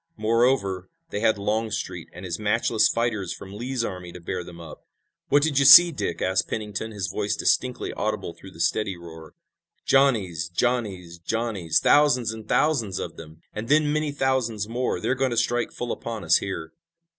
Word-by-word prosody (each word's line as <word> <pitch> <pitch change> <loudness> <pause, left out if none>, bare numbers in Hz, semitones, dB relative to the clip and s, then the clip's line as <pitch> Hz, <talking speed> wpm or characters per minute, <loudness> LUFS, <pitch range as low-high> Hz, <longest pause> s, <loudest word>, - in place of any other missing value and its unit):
Moreover, 110 -5 +1 0.2
they - - -2
had 110 -1 +2
Longstreet 105 -4 -3
and 90 +2 -10
his 85 0 -4
matchless 110 +1 +2
fighters 110 -6 -1
from 95 0 -11
Lee's 120 +3 -3
army 90 -3 -6
to 90 - -9
bear 90 +1 -4
them 85 0 -12
up. 80 -2 -11 0.5
"What 145 0 +4
do 160 - +3
you 140 -2 +2
see, 170 +6 +10
Dick?" 85 - -3
asked 95 0 +1
Pennington, 105 0 -4
his 100 -3 -4
voice 100 +3 -2
distinctly 125 -1 0
audible 105 -4 -3
through 95 - -13
the 85 - -16
steady 95 +2 0
roar. 80 -2 -12 0.5
"Johnnies! 100 - +2
Johnnies! 95 -5 -2
Johnnies! 105 -4 -1
Thousands 130 -6 +3
and 110 -1 -10
thousands 120 - +1
of - - -5
them 80 0 -13
and 110 +2 -5
then 150 0 +3
many 155 -1 0
thousands 130 -7 -1
more. 125 +3 -2
They're - - 0
going 135 0 0
to 120 - -3
strike 120 +1 0
full 120 -1 -5
upon 115 -3 -5
us 85 0 +5
here!" 80 -5 -5
110 Hz, 180 wpm, -24 LUFS, 90-120 Hz, 0.5 s, see